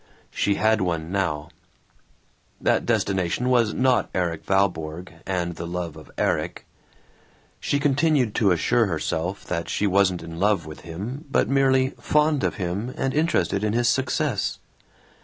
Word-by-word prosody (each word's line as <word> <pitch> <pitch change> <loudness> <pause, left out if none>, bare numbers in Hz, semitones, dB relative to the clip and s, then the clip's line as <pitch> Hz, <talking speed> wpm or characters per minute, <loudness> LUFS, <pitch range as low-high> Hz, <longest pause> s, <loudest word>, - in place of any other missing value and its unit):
She 100 - +1
had 110 0 +2
one 85 -2 -2
now. 80 -5 -1 1.1
That - - +1
destination 95 +5 0
was 120 -4 +3
not 130 -1 +2
Erik 85 -3 -1
Valborg 90 -3 0 0.2
and 90 -2 -1
the 85 - -5
love 85 -2 -4
of 80 -2 -13
Erik. - - -1 0.9
She 145 - 0
continued 145 -4 +2
to 105 - +3
assure 115 +6 +2
herself 80 +2 -2
that 85 -1 -3
she 105 - 0
wasn't 95 -3 +2
in 85 0 -8
love 100 -2 +2
with 75 -1 -9
him 105 - -6
but 115 -5 +2
merely 130 -1 +3
"fond 150 -1 +2
of - - 0
him, 100 +6 -3
and 135 0 -1
interested 155 -10 +1
in 105 0 +1
his 120 +1 +2
success." 130 -3 0
100 Hz, 145 wpm, -24 LUFS, 85-125 Hz, 1.1 s, was